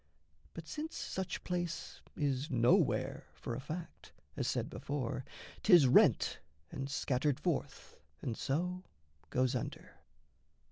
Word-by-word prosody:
But 165 Hz, -1 st, -7 dB
since 310 Hz, -, -5 dB
such 190 Hz, -1 st, -3 dB
place 175 Hz, -2 st, -3 dB, 0.2 s
is 140 Hz, 0 st, 0 dB
nowhere, 120 Hz, -3 st, +2 dB
for 75 Hz, +10 st, -5 dB
a 115 Hz, -, -3 dB
fact, 160 Hz, +5 st, -7 dB, 0.2 s
As -, -, -1 dB
said -, -, 0 dB
before, 130 Hz, -3 st, -3 dB, 0.4 s
'tis 175 Hz, -9 st, +8 dB
rent 125 Hz, -, +5 dB, 0.3 s
and 135 Hz, 0 st, -4 dB
scattered 135 Hz, 0 st, +1 dB
forth, -, -, -3 dB, 0.2 s
And 120 Hz, -, -3 dB
so 180 Hz, +9 st, -1 dB, 0.5 s
goes 130 Hz, 0 st, +2 dB
under. 125 Hz, -, -5 dB
140 Hz, 120 wpm, -34 LUFS, 130-175 Hz, 0.5 s, tis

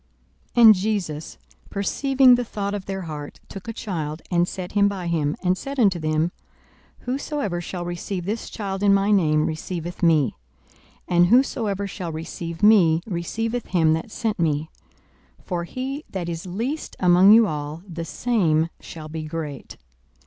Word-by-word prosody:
42:009:047 -, -, +6 dB
And 220 Hz, -, +11 dB
Jesus, 185 Hz, -6 st, -3 dB, 0.3 s
perceiving 265 Hz, +6 st, +3 dB
the 245 Hz, 0 st, +3 dB
thought 205 Hz, -3 st, -4 dB
of 200 Hz, -2 st, -4 dB
their 195 Hz, -1 st, -4 dB
heart, 150 Hz, -3 st, -7 dB
took 195 Hz, +1 st, -10 dB
a -, -, -2 dB
child, 160 Hz, -8 st, -4 dB
and 175 Hz, 0 st, +3 dB
set 180 Hz, -1 st, -6 dB
him 200 Hz, -1 st, +4 dB
by 195 Hz, -3 st, -3 dB
him, 160 Hz, -3 st, 0 dB
42:009:048 -, -, -10 dB
And 180 Hz, +1 st, +3 dB
said 275 Hz, 0 st, -5 dB
unto 195 Hz, -7 st, +3 dB
them, 155 Hz, +2 st, 0 dB, 0.7 s
Whosoever 255 Hz, -, -2 dB
shall 175 Hz, 0 st, -5 dB
receive 175 Hz, +1 st, -4 dB
this 215 Hz, +4 st, -3 dB
child 195 Hz, -3 st, -4 dB
in 200 Hz, -1 st, +5 dB
my 200 Hz, +1 st, +2 dB
name 155 Hz, -6 st, +3 dB
receiveth 170 Hz, +2 st, -5 dB
me: 155 Hz, -, +3 dB, 0.7 s
and 175 Hz, 0 st, +4 dB
whosoever 215 Hz, -4 st, +2 dB
shall 180 Hz, -3 st, -5 dB
receive 165 Hz, +2 st, -6 dB
me 175 Hz, -7 st, +6 dB
receiveth 225 Hz, +6 st, -3 dB
him 160 Hz, -3 st, +3 dB
that 160 Hz, +6 st, -3 dB
sent 220 Hz, -2 st, -2 dB
me: 155 Hz, -1 st, 0 dB, 0.7 s
for 175 Hz, -2 st, -2 dB
he 270 Hz, -, -5 dB
that 180 Hz, -3 st, -4 dB
is 170 Hz, +1 st, -5 dB
least 235 Hz, -, -4 dB
among 180 Hz, +2 st, +6 dB
you 225 Hz, +1 st, +8 dB
all, 150 Hz, -1 st, -4 dB
the 170 Hz, -2 st, -5 dB
same 165 Hz, -5 st, +1 dB
shall 155 Hz, -2 st, -9 dB
be 160 Hz, +1 st, -5 dB
great. 155 Hz, -3 st, -6 dB
180 Hz, 165 wpm, -23 LUFS, 165-210 Hz, 0.7 s, And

